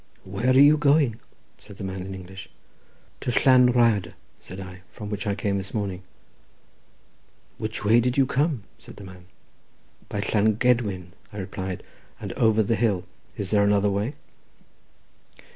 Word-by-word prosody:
"Where 100 +6 -2
are - - +5
you 145 +3 +7
going?" 145 -6 +3 0.4
said 100 -2 -14
the - - -7
man 95 -1 -4
in 95 +1 -6
English. 95 +1 -10 0.7
"To - - -2
Llan 125 -2 +6
Rhyadr," 115 -7 +2 0.3
said 95 - -10
I, 95 -1 -9
"from 105 -1 -8
which 105 +1 -4
I 100 - 0
came 100 0 -1
this 95 +3 -8
morning." 100 -3 -3 1.6
"Which 110 0 -4
way 115 +3 +5
did 125 +2 0
you 135 - +5
come?" 140 -2 0 0.2
said - - -13
the 105 - -11
man. 90 -1 -12 0.8
"By 100 - -2
Llan 105 +1 +2
Gedwin," 105 -7 0 0.2
I 105 - -10
replied, 95 -1 -5 0.4
"and - - -6
over 110 -1 +3
the 105 - 0
hill. 105 -6 +1 0.3
Is 95 -2 -4
there 105 -1 +4
another 100 0 +3
way?" 105 +8 -2
105 Hz, 160 wpm, -25 LUFS, 95-120 Hz, 1.6 s, you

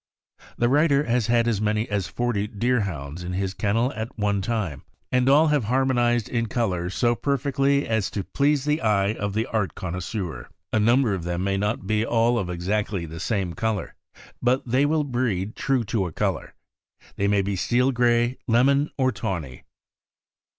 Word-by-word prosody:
The 120 - +2
writer 145 +1 +3
has 120 -4 0
had 115 0 +3
as 110 -3 0
many 110 +1 0
as 100 -4 -2
forty 110 -1 -1
Deerhounds 100 - -2
in 90 +1 -4
his 95 0 -2
kennels 115 +6 0
at 110 +3 -6
one 100 -2 0
time, 95 -9 -2 0.3
and 125 +1 +3
all 150 +3 +5
have 145 -6 +1
har 130 +4 +2
monized 120 -3 +1
in 115 -1 -1
color 95 -7 -1
so 120 +5 +1
perfectly 140 +2 0
as 110 -3 0
to 100 - -3
please 145 +3 +1
the 150 +1 +1
eye 105 -2 +2
of 100 -2 -4
the 110 +1 +1
art 105 -9 -2
connoisseur. 90 - -5 0.3
A 110 - +3
number 120 +1 +3
of 95 -4 -3
them 85 +1 -2
may 100 0 0
not 105 0 -1
be 110 +2 +1
all 115 +1 +2
of 95 -4 -3
exactly 95 +1 -2
the 80 +1 -8
same 95 -2 -1
color, 110 -2 -2 0.5
but 125 +2 +1
they 130 +4 +3
will 155 0 +1
breed 120 -7 -2
true 135 -3 0
to 105 -3 -1
a - - -7
color. - - -2 0.6
They 100 - 0
may 100 -1 +2
be 100 0 -2
steel 125 +7 +2
gray, 120 0 +2
lemon, 140 +5 +3
or 130 -2 +2
tawny. 85 - -5
110 Hz, 180 wpm, -24 LUFS, 100-125 Hz, 0.6 s, all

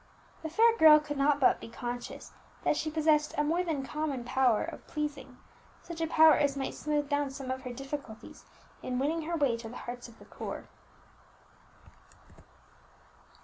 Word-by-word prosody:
The 320 - -5
fair 455 +7 +4
girl 310 -1 +9
could 295 -1 -6
not 280 +1 +3
but 265 - +4
be - - -9
conscious 240 +1 -6 0.3
that - - +2
she 310 - -2
possessed 305 -1 +2
a 295 - +2
more 335 +4 +1
than 305 -6 -2
common 285 -2 -3
power 245 -2 +2
of 330 -1 -8
pleasing, 300 -1 -5 0.5
such 335 -1 -7
a 325 - +1
power 315 -1 +7
as 285 -1 +1
might 270 - -3
smooth 295 -1 -1
down 285 -1 0
some 270 -1 -6
of 260 0 -4
her 250 -2 -6
difficulties 270 -3 -8 0.4
in 250 - -3
winning 310 +4 -1
her 340 - -1
way 280 -6 +2
to 230 -1 -8
the 245 - -9
hearts 245 0 -7
of 235 - -16
the - - -16
poor. - - -7
290 Hz, 175 wpm, -30 LUFS, 260-310 Hz, 0.5 s, girl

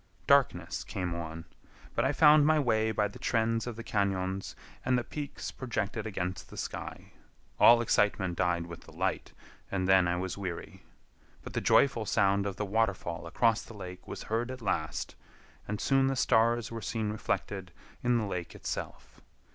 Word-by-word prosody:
Darkness 105 -12 +3
came 90 -3 -3
on, 80 -1 -6 0.5
but - - +1
I - - +2
found 150 -1 +7
my 155 +1 +4
way 110 -6 +2
by 105 -1 +1
the 100 - -12
trends 115 0 +1
of 120 - -4
the 115 - -7
cañons 95 -3 -1 0.3
and 130 -1 +2
the 120 - 0
peaks 145 +3 -6
projected 110 -3 -3
against 90 -3 -4
the - - -11
sky. - - -6 0.5
All 120 0 +8
excitement 100 -5 +2
died 85 -1 +1
with 85 -1 -9
the - - -15
light, - - -2 0.4
and 95 -2 -1
then 95 -2 +5
I 85 - +1
was 95 +1 -3
weary. 95 +1 -6 0.6
But - - -8
the - - -1
joyful 120 -6 +3
sound 100 +1 +2
of 100 - -4
the 105 - -2
waterfall 95 -5 -1
across 115 +5 +2
the 115 - -12
lake 90 -2 -9
was - - -6
heard 115 +3 -1
at 130 -2 -7
last, 80 -6 -2 0.5
and 105 0 -3
soon 135 +2 +3
the 135 - 0
stars 115 -1 +2
were 115 -1 -5
seen 105 +2 -2
reflected 100 -3 -3 0.3
in 120 -1 +3
the 110 - 0
lake 90 -4 -4
itself. - - -6
105 Hz, 175 wpm, -30 LUFS, 95-115 Hz, 0.6 s, All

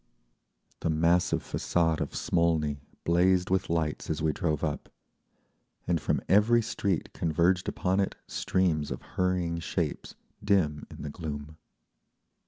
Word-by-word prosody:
The - - -1
massive 85 +3 +2
façade 80 -2 0
of - - -3
Smolny 80 -4 +1 0.2
blazed 90 +2 +3
with 95 -1 +1
lights 80 -2 -1
as 80 - -1
we 80 0 +1
drove 75 -1 -1
up, 75 -2 -2 1.0
and 85 -3 0
from - - 0
every 115 +4 +5
street 100 -5 -2
converged 85 +3 +1
upon 95 +1 0
it 100 - 0
streams 80 -6 0
of - - -5
hurrying 90 -2 0
shapes - - -3 0.3
dim 90 -8 +1
in - - -9
the 75 - -4
gloom. 75 -1 -6
85 Hz, 130 wpm, -29 LUFS, 75-90 Hz, 1.0 s, every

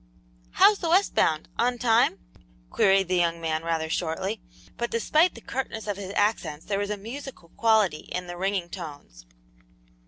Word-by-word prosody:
"How's 415 -1 +5
the 335 - -2
west 375 +4 +3
bound 155 -1 +1
on 245 +1 +2
time?" 235 0 +3 0.5
queried 195 -1 +3
the 185 0 +1
young 170 -1 +1
man 160 -1 -1
rather 165 -1 -1
shortly, 180 +6 -2 0.3
but 235 0 -2
despite 310 +9 +2
the 230 - -11
curtness 235 -3 -4
of 205 -2 -3
his 195 -1 -6
accents 205 -7 0
there 200 -1 -1
was 205 0 -2
a 210 - -2
musical 235 -3 -9
quality 215 -7 +1
in 180 0 -3
the 175 0 -7
ringing 190 0 -1
tones. 145 - -10
195 Hz, 165 wpm, -26 LUFS, 170-230 Hz, 0.5 s, How's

